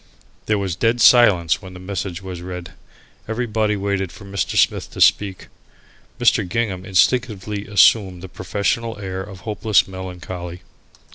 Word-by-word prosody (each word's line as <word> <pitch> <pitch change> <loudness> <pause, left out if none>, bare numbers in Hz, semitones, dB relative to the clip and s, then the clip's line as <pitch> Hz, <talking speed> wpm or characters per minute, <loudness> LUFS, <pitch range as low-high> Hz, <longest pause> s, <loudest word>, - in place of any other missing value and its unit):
There 105 - +2
was 95 -4 -2
dead 115 +5 +1
silence 100 -11 +5
when 95 -1 -11
the - - -9
message 95 -1 -5
was 90 -2 -7
read. 90 0 -7 0.6
Everybody 110 -2 -1
waited 100 -2 -2
for 105 -2 -13
Mr. 100 0 -2
Smith - - +2
to - - -8
speak. 100 -3 +2 0.7
Mr. 90 - +3
Gingham 100 -4 -2
instinctively 105 0 0
assumed 95 -2 +4
the - - -6
professional 105 +5 -2
air 95 -2 -5
of 95 -2 -10
hopeless 105 +1 +1
melancholy. 90 -2 -7
95 Hz, 140 wpm, -20 LUFS, 90-105 Hz, 0.7 s, silence